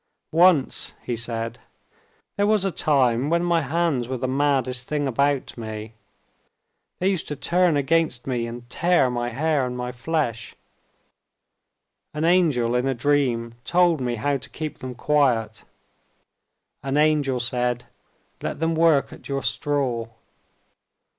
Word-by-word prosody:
"Once," 165 -4 +3
he 120 - -2
said, 115 +1 -4 0.8
"there 205 0 +1
was 210 -2 +2
a 195 - 0
time 135 -4 +2
when 170 +1 +2
my 170 -1 +2
hands 145 -4 0
were 130 0 -3
the 130 - -2
maddest 130 -2 0
things 145 -2 -1
about 140 +2 0
me. 110 0 -6 1.0
They 185 - 0
used 190 -4 0
to 150 - -4
turn 170 +3 +2
against 145 -3 +1
me 120 -3 -2
and 120 +1 -8
tear 170 -2 +2
my 120 0 -2
hair 145 +3 0
and 125 0 -3
my 125 0 -3
flesh. 125 -3 -3 1.6
An 155 +2 0
angel 155 -10 +3
in 125 +2 +1
a 135 - 0
dream 120 -3 +1
told 175 -3 +3
me 120 -1 -1
how 140 +4 0
to - - -11
keep 155 -1 -6
them 130 -1 -6
quiet. 120 -6 +1 1.2
An 135 +1 -1
angel 150 -4 +2
said, 120 0 -1 0.6
"Let - - -4
them 165 +1 +1
work 160 -3 +3
at - - -13
your 140 0 -2
straw." 130 -6 -1
135 Hz, 140 wpm, -23 LUFS, 120-155 Hz, 1.6 s, Once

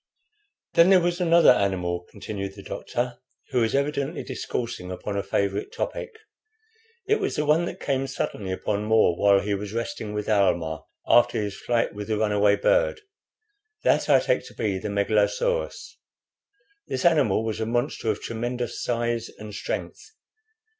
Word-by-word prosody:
"Then 170 +1 +6
there 190 -1 +7
was 175 +1 -1
another 170 -1 +6
animal," 90 -3 0
continued 100 -2 -6
the 100 - -11
doctor, 120 +4 -4 0.3
who 125 -2 +2
was 115 +1 +1
evidently 140 +2 -1
discoursing 120 -6 -4
upon 100 +2 -5
a 100 - 0
favorite 100 +1 -1
topic. 470 -1 -4 0.9
"It 430 +1 +2
was 395 - -1
the 150 - 0
one 155 +3 +3
that - - -6
came 135 -1 -1
suddenly 100 -6 -3
upon 105 +2 -2
More 110 -5 +4
while 100 +1 +4
he 105 - -1
was 100 +1 -4
resting 115 -2 -4
with 105 -1 -3
Almah 85 -7 +1 0.2
after 120 0 +4
his 100 -2 -3
flight 120 -1 0
with 105 0 -6
the 110 -1 0
run 105 0 +1
away 105 0 +4
bird. - - +2 0.8
That - - +2
I - - +7
take - - 0
to - - -14
be 100 -4 -1
the - - -4
Megalosaurus. 105 - 0 0.9
This 130 - -3
animal 140 - +3
was 110 -1 -3
a 110 - -2
monster 120 0 -1
of 105 - -1
tremendous 120 +1 -3
size 120 -1 -1
and 105 -1 -9
strength. - - -4
110 Hz, 160 wpm, -25 LUFS, 100-135 Hz, 0.9 s, there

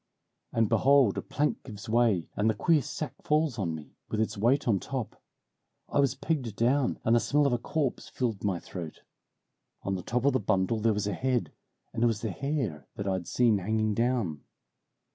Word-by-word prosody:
"And 115 -1 +2
behold 135 -3 +4
a - - -3
plank 150 0 -1
gives 105 -5 -9
way, 110 -6 +2
and 105 +2 +2
the 110 - +1
queer 155 +8 +3
sack 155 +2 -5
falls 150 -5 +1
on 85 -5 -1
me, 75 -2 -11
with 110 - -2
its 110 - 0
weight 120 +8 +2
on 105 -5 +3
top. 130 -1 -5 0.7
I - - +1
was 140 -1 +3
pegged 135 -6 -2
down, 125 +3 +2
and 115 - +4
the - - +5
smell 145 +4 +2
of 140 - +2
a 120 - +1
corpse 140 +1 -2
filled 115 -7 -2
my 100 -3 +1
throat 85 -3 -8 0.8
on 100 - -1
the 95 - -2
top 125 +7 -1
of 140 - +4
the 130 - +2
bundle 100 +1 +1
there 110 0 +2
was 105 0 -1
a 105 - -1
head, 130 +4 0 0.4
and - - -3
it - - +6
was 115 -2 -1
the 110 - -2
hair 135 - -3
that 100 - -4
I'd 95 -3 -1
seen 115 -5 +3
hanging 110 +2 0
down. 115 - 0
115 Hz, 200 wpm, -29 LUFS, 100-130 Hz, 0.8 s, it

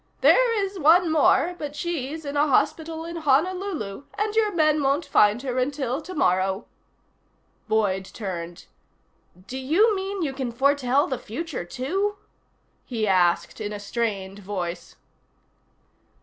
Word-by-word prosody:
"There 460 -5 +4
is 390 -1 -7
one 330 +2 +5
more, 320 +2 +3
but 295 -1 -5
she's 315 -2 -4
in 285 0 -4
a 290 +1 +3
hospital 320 +3 0
in 335 0 -6
Honolulu, 315 - 0
and 425 +1 -1
your 435 -2 +3
men 310 -4 +2
won't 280 +4 +1
find 210 -6 +4
her 255 -1 -1
until 270 +1 -1
tomorrow." 190 - 0 1.0
Boyd 205 -4 +1
turned. 175 -4 -6 0.8
"Do 260 +4 -6
you 375 - +3
mean 385 -1 -3
you 280 -4 -2
can 260 -3 -3
foretell 275 +2 +2
the 260 -3 -3
future, 280 - -5
too?" 375 - -2 0.7
he 225 -4 -2
asked 180 +2 +2
in 210 -1 -3
a 205 - -5
strained 200 -2 -3
voice. 185 -3 -5
280 Hz, 135 wpm, -24 LUFS, 210-335 Hz, 1.0 s, one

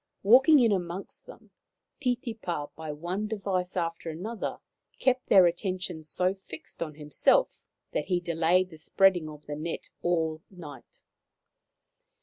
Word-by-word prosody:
Walking 260 +9 +7
in 235 -5 +4
amongst 180 0 -4
them, - - -14 0.5
Titipa, 225 - -2
by 160 -1 -6
one 175 +8 -3
device 190 -4 -2
after 165 -1 -2
another, 205 +8 -4 0.4
kept 255 -1 +1
their 190 -2 +7
attention 180 -1 -2
so 180 +5 0
fixed 190 -5 -12
on 155 -3 -4
himself 150 -1 +2 0.3
that - - -1
he 180 -2 +1
delayed 175 +2 +1
the 160 - -12
spreading 180 -1 +3
of 150 -1 -12
the 145 - -5
net 160 +3 -5
all 160 -2 0
night. 150 -9 -12
175 Hz, 135 wpm, -28 LUFS, 160-195 Hz, 0.5 s, Walking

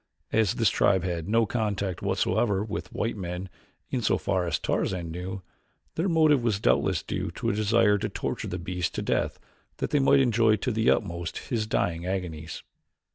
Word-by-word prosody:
As 110 -4 +2
this 115 -5 +3
tribe 95 -3 +3
had 85 -1 -3
no 115 +1 +4
contact 100 -5 -2
whatsoever 105 -4 +1
with 90 -5 -5
white 115 +2 -2
men 90 -1 -5 0.4
in 130 - 0
so 110 - +2
far 90 -2 0
as - - +1
Tarzan 85 -3 -1
knew, 90 +3 -5 0.5
their 175 +4 0
motive 155 -5 +4
was 110 -4 +1
doubtless - - +2
due - - -3
to - - -1
a - - -2
desire 105 0 +3
to - - -2
torture - - -3
the 90 - -3
beast 90 0 -3
to - - -2
death - - 0 0.4
that - - -3
they 145 - +3
might 140 0 +5
enjoy 115 -4 +4
to 125 +5 -2
the 110 0 +2
utmost 85 -5 -1
his 110 -3 -1
dying 90 -5 -1
agonies. 85 -4 -4
100 Hz, 185 wpm, -27 LUFS, 90-115 Hz, 0.5 s, might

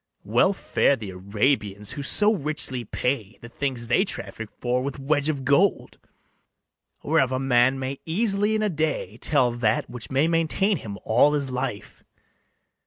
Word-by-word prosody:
Well 120 - +3
fare 180 -6 +1
the 110 -6 -7
Arabians, 100 +1 -1
who 145 - -5
so 210 +9 +3
richly 150 - -2
pay 115 -1 -3
The 115 - -10
things 130 -1 -3
they 125 +11 +3
traffic 110 - -6
for 125 +1 0
with 140 +1 -4
wedge 145 +2 0
of 140 -4 -3
gold, 175 +9 +2 1.0
Whereof 130 -1 +2
a 130 - 0
man 130 0 +3
may 135 +1 -4
easily 205 +4 +1
in 215 - 0
a 210 - +1
day 155 -1 -2
Tell 130 -5 +3
that 115 -2 0
which 115 -3 -7
may 135 +4 +2
maintain 170 +5 +1
him 100 -7 -7
all 125 +6 +4
his 140 -3 -1
life. 125 -5 -5
135 Hz, 160 wpm, -24 LUFS, 120-155 Hz, 1.0 s, all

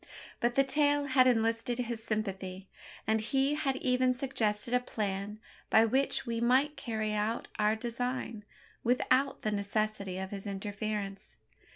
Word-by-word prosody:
But 240 0 +1
the 275 - +5
tale 290 +1 +2
had 260 -2 +5
enlisted 230 0 +1
his 235 -2 -3
sympathy; 195 -4 -3 0.4
and 220 +1 +2
he 270 +5 +1
had 295 -3 0
even 255 -1 +2
suggested 235 -4 -1
a 250 - +5
plan 210 -3 -3 0.3
by 220 - +6
which 265 +5 +1
we 230 -1 -2
might 265 +5 +3
carry 220 -5 -2
out 215 +2 -1
our 210 +1 +3
design, 235 -1 -3 0.4
without 255 +3 +2
the 215 - 0
necessity 200 -2 -1
of 190 0 -4
his 200 0 -6
interference. 200 - -4
225 Hz, 145 wpm, -31 LUFS, 210-255 Hz, 0.4 s, by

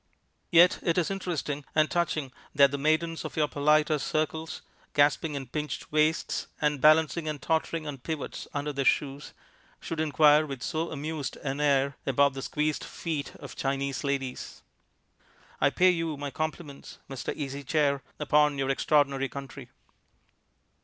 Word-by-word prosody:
Yet 175 +1 +6
it 170 0 0
is 180 +1 +1
interesting 160 -7 -3
and 155 0 +4
touching 155 -6 -1 0.2
that 140 -1 +6
the 140 - -3
maidens 160 +3 +1
of - - -7
your 150 -1 +3
politer 150 +1 +2
circles, 155 +3 -2 0.3
gasping 145 +1 +3
in 135 -1 -4
pinched 150 +4 -5
waists, 155 +1 +1
and 150 -2 0
balancing 155 +1 +4
and 150 -1 -4
tottering 160 +2 -1
on 145 -3 -6
pivots 155 +2 -5
under 145 0 -3
their 140 0 -1
shoes, 140 +1 0 0.5
should 165 - -5
inquire 155 0 +4
with 135 -3 -6
so 165 0 -2
amused 150 -1 -4
an 140 0 -2
air 140 -1 +2
about 140 +1 +3
the 135 - -6
squeezed 150 +2 -1
feet 155 -4 -4
of 140 -3 -10
Chinese 135 -1 -2
ladies. 135 -2 -4 1.0
I - - +4
pay 185 0 +4
you 165 -3 -2
my 145 0 -5
compliments, 155 0 -5
Mr. 135 -3 -4
Easy 140 -1 -5
Chair, 140 -1 +1 0.2
upon 150 -1 +3
your 135 0 0
extraordinary 140 -1 +2
country." 140 -2 -9
150 Hz, 150 wpm, -28 LUFS, 140-155 Hz, 1.0 s, Yet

